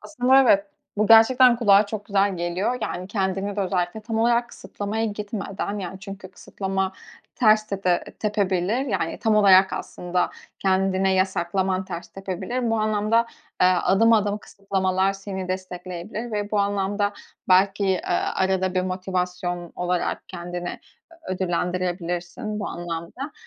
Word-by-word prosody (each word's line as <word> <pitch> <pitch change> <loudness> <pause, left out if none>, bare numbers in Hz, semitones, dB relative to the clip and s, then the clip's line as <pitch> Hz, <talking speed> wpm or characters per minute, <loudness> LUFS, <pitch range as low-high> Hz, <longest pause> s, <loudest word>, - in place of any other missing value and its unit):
Aslında 265 -2 +3
evet, 200 -5 +4 0.3
bu 210 +1 +2
gerçekten 240 +3 +7
kulağa 205 -3 +5
çok 205 -1 -5
güzel 200 -2 +1
geliyor. 175 +8 -1
Yani, 180 +1 -3
kendimi 195 0 -2
de 205 - 0
özellikle 180 +1 -1
tam 225 +1 -3
olarak 235 +1 +2
kısıtlamaya 210 +2 -4
gitmeden 205 -1 -4
yani 190 0 -6
çünkü 195 -1 -9
kısıtlama 190 0 -3 0.4
ters 215 -2 +4
tepe 190 -4 0 0.2
tepebilir. 210 +3 0
Yani, 190 -7 -2
tam 220 -1 +2
olarak 195 -2 +6
aslında 180 0 -2 0.3
kendine 190 0 +2
yasaklaman 190 0 0
ters 175 -2 -7
tepebilir. 195 +6 -3
Bu 225 - +1
anlamda, 215 +1 +1 0.5
ııı, 180 -1 +4
adım 225 +5 +4
adım 210 -1 +2
kısıtlamalar 190 -1 -1
seni 195 -1 -6
destekleyebilir 185 +4 -5
ve 205 -1 -2
bu 210 - +1
anlamda 205 +1 0 0.4
belki, 190 0 +3
aaa, - - 0
arada 190 0 +1
bir 185 - +2
motivasyon 180 -1 -3
olarak 180 0 -2
kendine 175 -1 -6 0.5
ö - - -1
ödüllendirebilirsin 180 +3 -2
bu - - -3
anlamda 175 - -6
195 Hz, 135 wpm, -24 LUFS, 185-210 Hz, 0.5 s, gerçekten